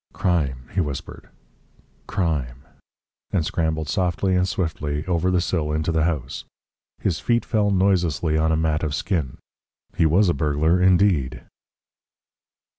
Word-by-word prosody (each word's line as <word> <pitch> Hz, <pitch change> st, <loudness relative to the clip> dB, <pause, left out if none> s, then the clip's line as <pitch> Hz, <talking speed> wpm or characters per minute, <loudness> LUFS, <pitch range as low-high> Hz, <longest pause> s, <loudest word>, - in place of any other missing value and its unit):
"Crime," 75 Hz, -10 st, -1 dB
he 95 Hz, -, +1 dB
whispered, 70 Hz, -4 st, -6 dB, 0.8 s
"crime," 70 Hz, -9 st, -2 dB, 0.7 s
and 85 Hz, -5 st, 0 dB
scrambled 80 Hz, -2 st, -1 dB
softly 95 Hz, 0 st, 0 dB
and 90 Hz, 0 st, +2 dB
swiftly 80 Hz, -7 st, -2 dB
over 90 Hz, 0 st, +1 dB
the 90 Hz, -1 st, +2 dB
sill 80 Hz, -4 st, -1 dB
into 80 Hz, +2 st, 0 dB
the 80 Hz, -1 st, +1 dB
house. 75 Hz, -7 st, -3 dB, 0.6 s
His 85 Hz, -6 st, -1 dB
feet 120 Hz, +4 st, +1 dB
fell 105 Hz, -2 st, +1 dB
noiselessly 90 Hz, -5 st, +1 dB
on 80 Hz, +1 st, +2 dB
a 80 Hz, -, +2 dB
mat 80 Hz, -1 st, 0 dB
of 75 Hz, -2 st, -1 dB
skin. 80 Hz, -10 st, -2 dB, 0.6 s
He 80 Hz, -, +3 dB
was 95 Hz, +6 st, +4 dB
a 85 Hz, -, +3 dB
burglar 75 Hz, +5 st, +1 dB
indeed! 90 Hz, -7 st, +2 dB
80 Hz, 135 wpm, -23 LUFS, 75-90 Hz, 0.8 s, was